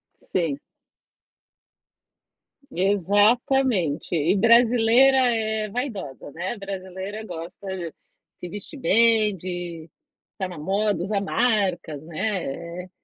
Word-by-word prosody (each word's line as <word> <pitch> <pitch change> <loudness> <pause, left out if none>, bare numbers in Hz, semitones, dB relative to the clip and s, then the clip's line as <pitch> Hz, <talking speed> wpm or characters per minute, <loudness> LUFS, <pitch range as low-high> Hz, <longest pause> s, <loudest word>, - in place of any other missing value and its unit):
Sim. 160 -6 -2 2.1
Exatamente. 205 - +2
E 165 +5 +2
brasileira 235 +4 +5
é 220 -4 +1
vaidosa, 200 - -5
né, 180 - -4
brasileira 195 +2 -6
gosta 175 +3 -8
de 170 -3 -6 0.4
se 180 - -7
vestir 205 - -9
bem, 225 -3 +4
de 175 -2 -6 0.4
estar 190 -2 -4
na 175 - -9
moda, 195 +4 0
usar 200 0 -1
marcas, 195 - 0
né, 170 -1 -4
é. - - -19
195 Hz, 95 wpm, -24 LUFS, 175-220 Hz, 2.1 s, brasileira